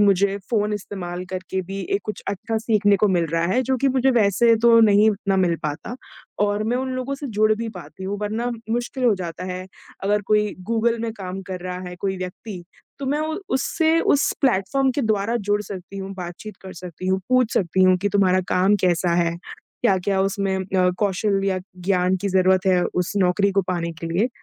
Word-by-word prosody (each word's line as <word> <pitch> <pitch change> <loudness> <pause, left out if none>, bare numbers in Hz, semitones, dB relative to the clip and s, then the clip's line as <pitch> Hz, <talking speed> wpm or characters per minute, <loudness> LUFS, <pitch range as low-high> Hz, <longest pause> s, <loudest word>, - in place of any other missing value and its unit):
मुझे 200 -1 +3
फ़ोन 210 -2 +1
इस्तेमाल 180 -3 -5
करके 185 0 -3
भी 195 +2 -6 0.2
एक 200 - +1
कुछ 215 - -5
अच्छा 200 +3 -2
सीखने 210 -3 +3
को 210 - +5
मिल 175 -3 +2
रहा 165 0 +1
है, 255 - +3
जो 260 +1 0
कि 275 +2 +2
मुझे 265 0 +2
वैसे 230 0 +4
तो 230 -1 +7
नहीं 210 0 +5
उतना 200 -1 -1
मिल 180 -3 +2
पाता 150 +10 -4 0.5
और 205 +1 0
मैं 235 +3 0
उन 260 +1 -2
लोगों 255 +2 -3
से 280 +1 -6
जुड़ 215 0 +5
भी 225 +1 -4
पाती 185 +2 -10
हूँ 200 +1 -3
वरना 220 +3 -2
म 235 -2 -6
मुश्किल 245 +2 -3
हो 235 -4 +5
जाता 175 -1 -6
है। 185 0 -6 0.4
अगर 205 +1 +2
कोई 210 -1 +2 0.2
गूगल 230 +1 +1
में 225 -1 -2
काम 190 -2 -6
कर 185 -1 -4
रहा 180 0 -4
है 180 - -8
कोई 190 -1 -1
व्यक्ति, 185 +1 -7 0.4
तो 275 - -5
मैं 290 +3 0
उ 315 0 -2 0.2
उससे 320 +4 +2
उस 285 -3 +2
प्लेटफ़ॉर्म 260 +2 +2
के 280 - +1
द्वारा 220 +1 +1
जुड़ 205 0 +3
सकती 195 -1 -8
हूँ, 195 0 -5
बातचीत 185 +3 -8
कर 190 - -8
सकती 180 +1 -8
हूँ, 190 0 +1
पूछ 255 -2 +2
सकती 185 0 +2
हूँ 185 0 +5
कि 205 +3 0
तुम्हारा 185 -2 +3
काम 190 +3 +3
कैसा 175 -1 +2
है। 170 0 -2
क्या-क्या 195 +1 -2
उसमें 195 0 0
अ, 185 -1 +1
कौशल 200 0 +1
या 190 -1 +1 0.2
ज्ञान 180 0 +1
की 200 - 0
ज़रूरत 185 0 +3
है 180 -2 +4
उस 180 +1 -1
नौकरी 195 +2 +2
को 195 0 +2
पाने 170 -1 -2
के 165 - -4
लिए। 190 +9 +1
200 Hz, 210 wpm, -22 LUFS, 185-225 Hz, 0.5 s, तो